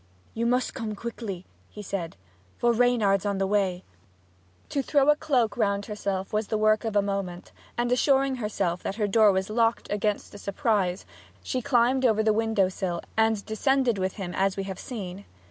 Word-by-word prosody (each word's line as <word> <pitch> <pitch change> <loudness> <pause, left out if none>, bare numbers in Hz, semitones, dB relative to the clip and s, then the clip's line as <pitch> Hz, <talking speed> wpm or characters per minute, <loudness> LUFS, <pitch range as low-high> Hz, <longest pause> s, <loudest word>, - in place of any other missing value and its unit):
'You 230 +1 -1
must 250 +1 +1
come 220 -4 -4
quickly,' 205 -4 -6 0.2
he 210 - -9
said; 180 - -4 0.4
'for 240 0 +3
Reynard's 225 -5 +3
on 200 -1 -1
the 195 - +1
way!' 190 -2 0 0.9
To 280 - 0
throw 280 +1 +2
a - - +3
cloak 265 -8 +1
round 200 -3 +1
herself 200 -3 -3
was 215 0 0
the 215 - -1
work 215 0 +3
of 220 -2 -3
a 205 - +4
moment, 195 -3 -4 0.3
and 240 0 0
assuring 270 +1 +3
herself 205 -6 -2
that 195 - -4
her 215 -1 0
door 215 0 +5
was 190 +2 -1
locked 230 +1 +1
against 205 0 -1
a 205 - -9
surprise, 200 -4 0 0.4
she 255 - -2
climbed 250 +2 +2
over 220 -3 +3
the 215 0 +3
window 220 -3 +2
sill 185 -2 -3
and 220 -2 +2
descended 240 0 +1
with 185 0 -1
him 185 -3 -6
as 195 0 0
we 195 - -1
have 190 -1 -6
seen. 200 -5 -7
210 Hz, 185 wpm, -26 LUFS, 195-235 Hz, 0.9 s, door